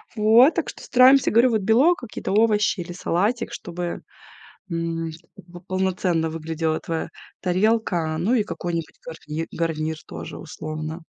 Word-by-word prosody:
Вот, 225 +7 +6
так - - -1
что - - -10
стараемся, 255 +2 +5
говорю, 235 +3 +5
вот, 220 -2 +1
белок, 255 - +4
какие-то 235 -5 -6
овощи 210 -3 +3
или 175 +1 -7
салатик, 205 +7 -1
чтобы, 175 -2 -5 0.7
м, 165 -1 -2 0.3
как - - -15
бы 175 0 -12
полноценно 185 -3 0
выглядела 160 0 -2
твоя 165 -1 -4 0.3
тарелка, 180 -4 +1
ну 210 +9 +1
и 215 - +2
какой-нибудь 170 -5 -5
гарнир, 160 0 -6
гарнир 160 -1 -2
тоже - - -8
условно. 155 +1 -6
175 Hz, 140 wpm, -23 LUFS, 165-220 Hz, 0.7 s, Вот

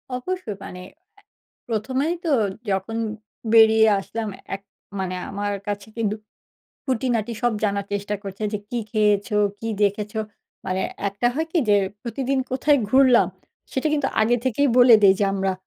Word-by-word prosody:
অবশ্যই 360 - -4
মানে 180 - -8
অ্যা 355 +6 -47 0.5
১ম 230 +3 -2
এই 340 - 0
তো 325 - +1 0.4
যখন 195 +4 -2 0.6
বেরিয়ে 220 -1 +7
আসলাম, 220 +3 -5 0.3
এক 195 - -10 0.4
মানে 185 -1 -2
আমার 205 +1 -2
কাছে 205 0 -4
কিন্তু 215 -2 0 0.7
খুঁটিনাটি 240 -3 -1
সব 240 -1 +2
জানার 200 -1 -1
চেষ্টা 205 +1 -2
করছে 195 +1 -7
যে, 210 - -1
"কি 245 - -1
খেয়েছো? 210 -1 +2 0.2
কি 225 - -5
দেখেছো?" 210 +2 0 0.5
মানে 185 0 -1 0.3
একটা 200 +5 -1
হয় 320 +3 -1
কি 350 - +2
যে, 205 - +6 0.3
প্রতিদিন 265 +2 -2
কোথায় 285 +3 +3
ঘুরলাম, 255 -6 +5 0.4
সেটা 265 - -1
কিন্তু 290 -3 +1
আগে 230 +3 +3
থেকেই 275 +3 +2
বলে 245 -2 +8
দেই 195 -1 +7
যে, 205 - +2
"আমরা 195 -1 0
220 Hz, 155 wpm, -23 LUFS, 200-255 Hz, 0.7 s, বলে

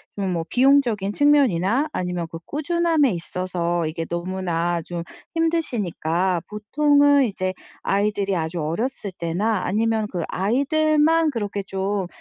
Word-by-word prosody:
좀 195 -2 -2
뭐 165 - -1
비용적인 245 -7 +3
측면이나 275 - +3
아니면 180 -1 -2
그 165 - -6
꾸준함에 315 -2 +1
있어서 175 -1 -2
이게 160 +1 -3
너무나 175 -1 -1
좀 170 +1 -5 0.3
힘드시니까 190 - 0
보통은 285 +6 +3
이제 185 -4 -2 0.3
아이들이 200 -1 0
아주 165 +1 -2
어렸을 200 - -2
때나 185 +4 -1
아니면 220 +2 0
그 175 -3 -2
아이들만 310 - +2
그렇게 205 -6 -3
좀, 195 0 -2
200 Hz, 295 characters per minute, -23 LUFS, 175-280 Hz, 0.3 s, 비용적인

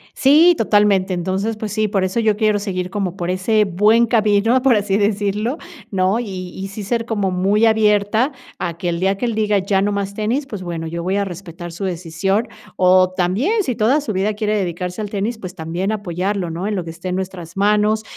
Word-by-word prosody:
Sí, 315 +6 +6
totalmente. 205 -3 +3
Entonces, 190 +5 -2
pues 215 -2 -5
sí, 215 -1 +1
por 195 -2 0
eso 185 +5 -1
yo 220 -2 +2
quiero 215 -1 +2
seguir 185 -3 -3
como 190 -2 -3
por 175 -2 -4
ese 210 +4 +2
buen 210 +5 +3
camino, 220 +2 +3
por 265 -3 +4
así 205 -1 +1
decirlo, 210 +5 0 0.3
¿no?, 190 +3 +1
y 185 -6 -5
y 195 - -4
sí 200 +1 -7
ser 230 +3 -1
como 205 -5 -1
muy 195 +5 +2
abierta 220 +3 +2 0.3
a 170 -2 -3
que 175 +1 -2
el 170 0 -2
día 195 +1 +1
que 245 - -2
él 230 -2 -1
diga: 210 -2 +2
"Ya 195 0 +1
no 205 +1 +1
más 200 -1 -2
tenis", 230 +7 -1
pues 210 -6 -6
bueno, 165 -2 -4
yo 170 +1 -4
voy 185 +2 -1
a 200 - 0
respetar 175 -2 -8
su 190 +4 -5
decisión. 185 +5 -1 0.3
O 185 0 +4
también, 235 - +1
si 255 -8 -2
toda 240 +7 +2
su 230 -7 -4
vida 195 +3 0
quiere 210 0 -1
dedicarse 180 +1 -3
al 205 - -4
tenis, 210 +3 -2
pues 185 -3 -8
también 175 +4 -3
apoyarlo, 195 -2 -2
¿no?, 170 +4 -4
en 210 - -1
lo 180 - -2
que 165 - -8
esté 180 +3 -7
en 180 - -1
nuestras 185 -3 -6
manos, 210 +2 +2
200 Hz, 220 wpm, -19 LUFS, 185-215 Hz, 0.3 s, Sí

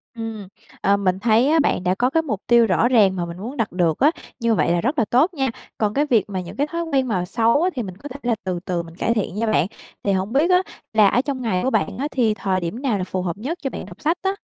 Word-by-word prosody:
Ừm, 225 -3 -6 0.3
ờ, 200 +1 +3
mình 190 -2 0
thấy 225 +4 +3
á 320 +1 +4
bạn 235 - +1
đã 180 +1 +1
có 250 +4 +1
cái 325 +3 +1
mục 215 -10 -3
tiêu 235 -1 +6
rõ 210 +4 +2
ràng 210 -7 +4
mà 175 - -2
mình 170 +1 -8
muốn 240 +9 -7
đặt 225 -4 -1
được 170 -3 +1
á, 295 +3 +5 0.3
như 230 -1 +2
vậy 170 - +2
là 175 0 +1
rất 275 +4 0
là 230 - +3
tốt 290 - +2
nha. 270 -4 0 0.3
Còn 210 -1 0
cái 290 +5 +2
việc 230 -7 +2
mà 190 -2 -3
những 175 - -9
cái 290 +2 0
thói 335 +2 -3
quen 275 -5 0
mà 185 -6 -1
xấu 230 - +2
á 365 - +3
thì 245 - -2
mình 185 -3 -8
có 285 +7 -9
thể 270 - -8
là 240 -1 +1
từ 180 -2 -2
từ 175 -2 -1
mình 165 0 -13
cải 230 - 0
thiện 210 -5 -2
nha 225 +2 -1
bạn. 200 -4 +2 0.4
Thì 200 - +1
hổng 190 +3 -1
biết 300 +6 +3
á 365 0 +5 0.3
là 215 -2 +6
ở 245 - +3
trong 270 -2 -4
ngày 185 -6 0
của 260 - +2
bạn - - 0
á 285 +3 -1
thì 230 -5 +2
thời 195 -2 -1
điểm 175 +9 -4
nào 250 -7 0
là 185 - -2
phù 185 0 -3
hợp 175 -1 -3
nhất 285 +11 -4
cho 270 - -2
bạn - - -7
đọc - - -13
sách 330 +4 +1
á? 385 - +1
225 Hz, 305 wpm, -22 LUFS, 190-270 Hz, 0.4 s, tiêu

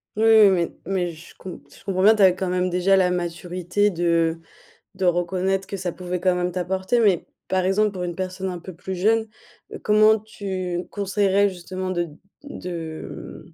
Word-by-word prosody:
Oui, 220 - 0
oui, 220 -2 +8
oui, 175 -3 0
mais 180 -3 -1
je 165 +1 -14
com 185 -6 -9
je - - -18
comprends 185 -1 -1
bien, 215 +3 +7
tu 210 - +3
as 185 - +8
quand 185 0 -3
même 180 0 0
déjà 180 +2 +3
la 180 -1 +3
maturité 180 +3 -1
de 165 -2 +1 0.6
de 190 0 -3
reconnaître 185 +2 0
que 195 - -5
ça 185 -2 -3
pouvait 180 +1 -5
quand 185 0 +2
même 180 0 -1
t'apporter, 190 +6 0
mais 200 -7 +3 0.2
par 185 -1 +1
exemple 210 +3 +2
pour 180 -2 -4
une 175 - -3
personne 185 +1 -4
un 180 - -4
peu 185 - -9
plus 190 +2 -6
jeune, 220 +5 +2 0.5
heu, - - -6
comment 215 +1 +5
tu 185 -4 -4
conseillerais 200 0 +2
justement 185 0 -5
de 175 -2 -1 0.4
de 170 - -7
mmh - - -21
185 Hz, 190 wpm, -23 LUFS, 175-195 Hz, 0.6 s, oui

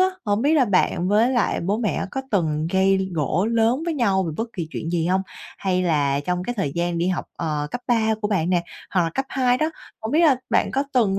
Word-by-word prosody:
á, 370 - +6 0.2
hổng 205 +2 0
biết 295 +3 +3
là 280 -5 +5
bạn 185 -2 +1
với 220 +5 +3
lại 240 -4 +1
bố 200 +6 -1
mẹ 220 -4 -1
có 265 - -3
từng 155 -6 0
gây 190 0 +2
gổ 165 +5 0
lớn 230 +5 +2
với 335 - -1
nhau 200 -8 +2
về 165 -4 -3
bất 225 +4 -2
kỳ 170 -5 -5
chuyện 165 - -4
gì 170 -1 0
hông? 190 +1 +2 0.4
Hay 185 -1 0
là 145 -5 +1
trong 180 +4 -2
cái 245 +5 -3
thời 190 -10 -2
gian 170 0 -1
đi 175 - +1
học, 185 - -1
ờ, 150 -3 -2
cấp 245 - -4
3 220 -2 +2
của 210 - -1
bạn 180 -4 0
nè, 175 -2 +2 0.3
hoặc 185 - +2
là 165 - -1
cấp 270 - 0
2 250 -1 +1
đó, 310 +3 +1 0.3
hổng 220 +3 -4
biết 320 - +4
là 300 -6 +5
bạn - - +2
có 275 +2 0
từng 200 -6 +3
195 Hz, 250 wpm, -23 LUFS, 170-240 Hz, 0.4 s, á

